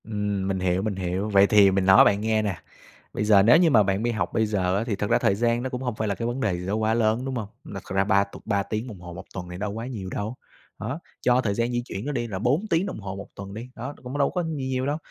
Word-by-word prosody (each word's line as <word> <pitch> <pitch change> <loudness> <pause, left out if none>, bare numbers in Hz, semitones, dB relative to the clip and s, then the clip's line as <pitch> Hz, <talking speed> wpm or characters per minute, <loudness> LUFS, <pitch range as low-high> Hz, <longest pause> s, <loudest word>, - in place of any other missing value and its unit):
Ừm, 105 -3 -2
mình 95 -1 -1
hiểu, 90 0 +1
mình 105 -1 -2
hiểu, 95 +2 -2
vậy 100 -1 +5
thì 100 -2 +6
mình 95 0 +1
nói 95 0 +8
bạn 100 0 +3
nghe 110 0 +1
nè. 100 -4 -2 0.6
Bây - - -1
giờ 105 -2 +6
nếu 120 +8 +7
như 170 -1 +4
mà 110 -4 +6
bạn 100 +2 0
mi 120 - +1
học 110 - -2
bây 110 - +2
giờ 100 -1 0
thì - - -3
á, - - +1
thật 105 - -1
ra - - +4
thời 100 - +2
gian 120 +2 +1
nó 130 - -2
cũng 125 -1 -5
hông 125 -4 -2
phải 110 0 -2
là 100 - -1
cái 115 - -3
vấn 120 +2 -3
đề 105 -6 +1
gì 90 - -6
đó 100 - 0
quá 110 0 +1
lớn, 115 +2 +1
đúng 135 -1 -3
không? 110 -4 -3 0.2
Nực 100 -1 -8
à, - - -8
ra 95 - +4
ba 100 -1 +3
tục 100 - -12
3 100 -2 +1
tiếng 110 +4 -4
đồng 105 -7 -9
hồ 85 -1 -9
1 85 - -9
tuần 90 -2 -6
thì 90 - -6
đâu 105 +1 -3
quá 115 +3 -5
nhiều 105 -8 -6
đâu. 105 +5 -4 0.4
Đó, 130 +8 -4 0.2
cho 125 0 +3
thời 105 -5 0
gian 115 +3 0
di 120 0 0
chuyển 100 -2 -6
nữa 145 - -2
đi 120 -4 -2
là 95 -4 -4
4 140 - +1
tiếng 165 +3 +2
đồng 190 - -5
hồ 100 -2 -6
1 100 +1 -8
tuần 100 0 -8
đi, 115 +4 -7
đó, 130 +4 -6
cũng 125 +3 -5
đâu 140 - +3
có 180 -1 -1
gì 165 - -3 0.2
nhiều 130 0 -1
đâu. 145 +2 0
110 Hz, 320 wpm, -25 LUFS, 100-120 Hz, 0.6 s, nói